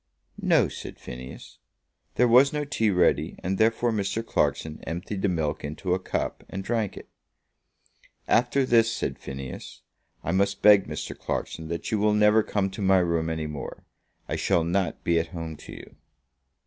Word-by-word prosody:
"No," -, -, +4 dB
said -, -, -8 dB
Phineas. 65 Hz, 0 st, -10 dB, 0.6 s
There 125 Hz, -, +4 dB
was 125 Hz, +4 st, +6 dB
no 150 Hz, -1 st, -2 dB
tea 115 Hz, -6 st, +1 dB
ready, 90 Hz, -3 st, +2 dB
and 95 Hz, +1 st, -1 dB
therefore 115 Hz, +2 st, +3 dB
Mr. 110 Hz, +1 st, -2 dB
Clarkson 80 Hz, -7 st, -1 dB
emptied 90 Hz, +4 st, -4 dB
the 100 Hz, -, +2 dB
milk 80 Hz, -4 st, -1 dB
into 75 Hz, +5 st, -2 dB
a 95 Hz, -, +1 dB
cup -, -, -3 dB
and 95 Hz, -, -5 dB
drank 110 Hz, -1 st, -1 dB
it. -, -, -10 dB, 1.2 s
"After 125 Hz, +3 st, +3 dB
this," 115 Hz, -2 st, +4 dB
said -, -, -3 dB
Phineas, 65 Hz, -1 st, -8 dB, 0.4 s
"I -, -, -1 dB
must 100 Hz, +2 st, 0 dB
beg, 105 Hz, -2 st, +7 dB
Mr. -, -, -5 dB
Clarkson, 80 Hz, -, -4 dB
that 85 Hz, +1 st, -4 dB
you 110 Hz, -, +1 dB
will 105 Hz, 0 st, +3 dB
never 105 Hz, +1 st, +5 dB
come 100 Hz, -2 st, -1 dB
to 100 Hz, -, -7 dB
my 95 Hz, -1 st, +4 dB
room 85 Hz, -2 st, +1 dB
any 80 Hz, -1 st, -2 dB
more. 75 Hz, -2 st, -7 dB, 0.4 s
I -, -, -2 dB
shall 85 Hz, -, +2 dB
not 90 Hz, +2 st, -1 dB
be 85 Hz, -1 st, +3 dB
at 80 Hz, -, -2 dB
home 80 Hz, -1 st, -5 dB
to -, -, -12 dB
you." -, -, -11 dB
95 Hz, 175 wpm, -26 LUFS, 80-110 Hz, 1.2 s, beg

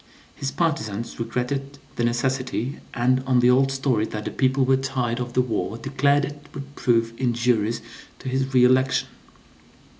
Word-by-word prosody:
His 135 Hz, -, -3 dB
partizans 135 Hz, -8 st, -2 dB
regretted 135 Hz, +4 st, -3 dB, 0.2 s
the 120 Hz, -, -1 dB
necessity, 130 Hz, +2 st, -1 dB
and 130 Hz, +2 st, +2 dB
on 130 Hz, -2 st, +4 dB
the 125 Hz, +1 st, +5 dB
old 135 Hz, +2 st, +3 dB
story 130 Hz, -5 st, 0 dB
that 105 Hz, 0 st, -6 dB
the -, -, -3 dB
people 130 Hz, 0 st, +2 dB
were 130 Hz, +1 st, +4 dB
tired 130 Hz, -2 st, -1 dB
of 120 Hz, -1 st, -4 dB
the 125 Hz, -, +3 dB
war 110 Hz, -3 st, -2 dB
declared 140 Hz, +2 st, +2 dB
it 145 Hz, 0 st, -9 dB
would 140 Hz, 0 st, -8 dB
prove 115 Hz, -4 st, +1 dB
injurious 120 Hz, -3 st, +1 dB, 0.4 s
to -, -, -10 dB
his 130 Hz, +1 st, -1 dB
re 125 Hz, -2 st, +5 dB
election. 130 Hz, +1 st, +3 dB
130 Hz, 160 wpm, -24 LUFS, 120-135 Hz, 0.4 s, the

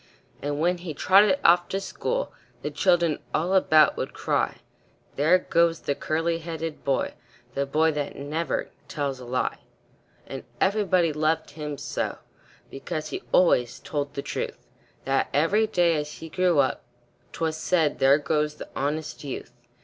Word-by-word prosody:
And 145 Hz, 0 st, -2 dB
when 175 Hz, +2 st, +1 dB
he 170 Hz, -4 st, -6 dB
trotted 190 Hz, +3 st, +5 dB
off 175 Hz, +1 st, +6 dB
to 195 Hz, -, -1 dB
school, -, -, -3 dB, 0.3 s
The -, -, -2 dB
children 170 Hz, -4 st, +2 dB, 0.2 s
all 175 Hz, +4 st, 0 dB
about 155 Hz, -5 st, +5 dB
would -, -, -3 dB
cry, -, -, -1 dB, 0.5 s
"There 155 Hz, +6 st, +5 dB
goes 170 Hz, -2 st, +1 dB
the 140 Hz, -, 0 dB
curly 165 Hz, +3 st, -1 dB
headed 165 Hz, -1 st, -5 dB
boy 135 Hz, -1 st, 0 dB, 0.4 s
The 140 Hz, 0 st, -1 dB
boy 155 Hz, +3 st, +3 dB
that 145 Hz, -2 st, -3 dB
never 155 Hz, +4 st, -3 dB, 0.2 s
tells 140 Hz, -6 st, -3 dB
a 125 Hz, -, -9 dB
lie." 125 Hz, +1 st, -1 dB, 0.7 s
And 135 Hz, -, -7 dB, 0.2 s
everybody 190 Hz, -5 st, +2 dB
loved 155 Hz, +2 st, 0 dB
him 150 Hz, -2 st, -5 dB
so, 145 Hz, +2 st, -3 dB, 0.5 s
Because 155 Hz, +2 st, -5 dB
he -, -, -4 dB
always 125 Hz, -9 st, +3 dB
told 145 Hz, -1 st, -4 dB
the 140 Hz, -, -3 dB
truth, -, -, -4 dB, 0.5 s
That 135 Hz, 0 st, +1 dB
every 195 Hz, +9 st, +3 dB
day, 175 Hz, -5 st, +3 dB
as 150 Hz, 0 st, -4 dB
he 165 Hz, -, -9 dB
grew 180 Hz, -1 st, +2 dB
up, 135 Hz, -2 st, +2 dB, 0.5 s
'Twas 160 Hz, -1 st, -2 dB
said, 160 Hz, -2 st, +1 dB
"There 135 Hz, +1 st, +6 dB
goes 150 Hz, +1 st, 0 dB
the -, -, -9 dB
honest 150 Hz, +3 st, -3 dB
youth." 130 Hz, -3 st, -6 dB
155 Hz, 155 wpm, -26 LUFS, 145-175 Hz, 0.7 s, off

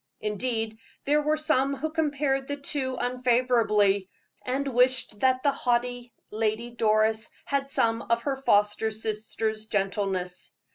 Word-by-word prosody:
Indeed, 220 Hz, +1 st, -2 dB, 0.3 s
there 295 Hz, +2 st, +3 dB
were 305 Hz, +1 st, +1 dB
some 280 Hz, -3 st, +2 dB
who 310 Hz, +4 st, -3 dB
compared 285 Hz, -4 st, 0 dB
the 285 Hz, -, -3 dB
two 275 Hz, -2 st, -2 dB
unfavorably, 235 Hz, -6 st, +2 dB, 0.3 s
and 270 Hz, +2 st, -2 dB
wished 250 Hz, -4 st, +2 dB
that 260 Hz, +1 st, +2 dB
the 285 Hz, -, +4 dB
haughty 245 Hz, -2 st, -1 dB, 0.2 s
Lady 220 Hz, +2 st, -1 dB
Doris 220 Hz, -1 st, +1 dB, 0.2 s
had 275 Hz, -1 st, -1 dB
some 230 Hz, -3 st, +1 dB
of 235 Hz, 0 st, +2 dB
her 275 Hz, -2 st, -1 dB
foster 210 Hz, -4 st, +2 dB
sister's 220 Hz, 0 st, -3 dB
gentleness. 195 Hz, -3 st, -2 dB
240 Hz, 130 wpm, -27 LUFS, 215-270 Hz, 0.3 s, the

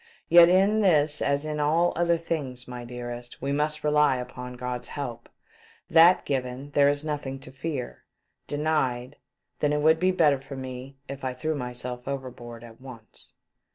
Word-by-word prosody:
Yet 170 Hz, 0 st, +8 dB
in 195 Hz, +4 st, +4 dB
this 150 Hz, -6 st, +3 dB
as 140 Hz, +1 st, 0 dB
in 150 Hz, -1 st, -3 dB
all 160 Hz, +4 st, +2 dB
other 170 Hz, 0 st, +2 dB
things, 140 Hz, -7 st, -4 dB
my 125 Hz, -1 st, -7 dB
dearest, 120 Hz, 0 st, -7 dB
we 135 Hz, +2 st, -2 dB
must 150 Hz, +1 st, -1 dB
rely 150 Hz, -3 st, +3 dB
upon 125 Hz, 0 st, -7 dB
God's 125 Hz, 0 st, -4 dB
help. 120 Hz, -5 st, -6 dB, 0.6 s
That 170 Hz, +2 st, +6 dB
given 130 Hz, +1 st, -3 dB
there 140 Hz, 0 st, +4 dB
is 145 Hz, +1 st, -1 dB
nothing 145 Hz, -3 st, -3 dB
to 130 Hz, -, -9 dB
fear; 135 Hz, -1 st, -5 dB, 0.4 s
denied 145 Hz, -4 st, -1 dB, 0.2 s
— -, -, -52 dB
then 150 Hz, -, +1 dB
it 150 Hz, -, 0 dB
would 160 Hz, +1 st, +4 dB
be 185 Hz, -, +3 dB
better 155 Hz, -7 st, +3 dB
for 135 Hz, 0 st, -9 dB
me 130 Hz, +1 st, -8 dB
if 140 Hz, 0 st, -8 dB
I 130 Hz, -1 st, -2 dB
threw 155 Hz, +5 st, -2 dB
myself 125 Hz, -2 st, -5 dB
overboard 125 Hz, -4 st, -6 dB
at 115 Hz, +1 st, -14 dB
once." 120 Hz, -4 st, -13 dB
140 Hz, 170 wpm, -26 LUFS, 125-155 Hz, 0.6 s, Yet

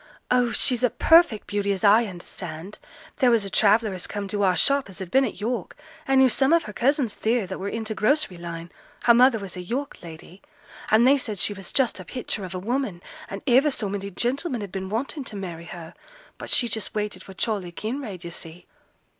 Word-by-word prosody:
'Oh! 250 Hz, -1 st, +3 dB
she's 250 Hz, -1 st, +2 dB
a 250 Hz, -, +5 dB
perfect 325 Hz, -10 st, +4 dB
beauty, 200 Hz, 0 st, -1 dB
as 195 Hz, -2 st, -2 dB
I 215 Hz, +3 st, +6 dB
understand. 175 Hz, -2 st, -8 dB, 0.4 s
There 260 Hz, -4 st, +4 dB
was 230 Hz, -4 st, +3 dB
a 195 Hz, -, -6 dB
traveller 215 Hz, 0 st, +3 dB
as 185 Hz, -, -4 dB
come 205 Hz, -1 st, -4 dB
to 205 Hz, +1 st, -2 dB
our 185 Hz, -2 st, +3 dB
shop 275 Hz, +6 st, +2 dB
as 190 Hz, -, -11 dB
had 185 Hz, -2 st, -7 dB
been 265 Hz, +4 st, +4 dB
at -, -, -5 dB
York, 230 Hz, +3 st, -3 dB, 0.3 s
and 270 Hz, 0 st, +4 dB
knew 265 Hz, -, +7 dB
some 265 Hz, +5 st, +2 dB
of 335 Hz, -1 st, +4 dB
her 210 Hz, -, -8 dB
cousins 255 Hz, 0 st, +1 dB
theere 230 Hz, -1 st, 0 dB
that 190 Hz, 0 st, -6 dB
were 195 Hz, +1 st, -3 dB
in 225 Hz, +1 st, -4 dB
t' 220 Hz, -, -2 dB
grocery 215 Hz, -, +1 dB
line 170 Hz, 0 st, -7 dB, 0.3 s
her 235 Hz, -, +7 dB
mother 245 Hz, 0 st, +5 dB
was 195 Hz, -4 st, -7 dB
a 180 Hz, -, -5 dB
York 255 Hz, +10 st, -4 dB
lady 170 Hz, +3 st, -12 dB, 0.5 s
and 220 Hz, +2 st, +5 dB
they 280 Hz, +1 st, +5 dB
said 215 Hz, -5 st, -4 dB
she 205 Hz, -, +1 dB
was 195 Hz, -2 st, -7 dB
just 260 Hz, -7 st, +1 dB
a -, -, -7 dB
picture 230 Hz, 0 st, -4 dB
of 185 Hz, -1 st, -6 dB
a -, -, -1 dB
woman, 210 Hz, -2 st, -2 dB, 0.3 s
and 195 Hz, -, -7 dB
iver 265 Hz, +4 st, +5 dB
so 245 Hz, -7 st, -1 dB
many 200 Hz, 0 st, -4 dB
gentlemen 245 Hz, -, -2 dB
had 200 Hz, -3 st, -6 dB
been 190 Hz, 0 st, -5 dB
wantin' 270 Hz, +7 st, -3 dB
to 215 Hz, -, -6 dB
marry 175 Hz, -4 st, -6 dB
her, 170 Hz, -2 st, -9 dB, 0.5 s
but -, -, -7 dB
she 240 Hz, -, +3 dB
just 220 Hz, -2 st, -4 dB
waited 210 Hz, -3 st, -3 dB
for 190 Hz, -, -12 dB
Charley 200 Hz, -5 st, -2 dB
Kinraid, 215 Hz, -2 st, -5 dB
yo' 170 Hz, -, -7 dB
see!' 165 Hz, 0 st, -9 dB
210 Hz, 225 wpm, -25 LUFS, 190-250 Hz, 0.5 s, knew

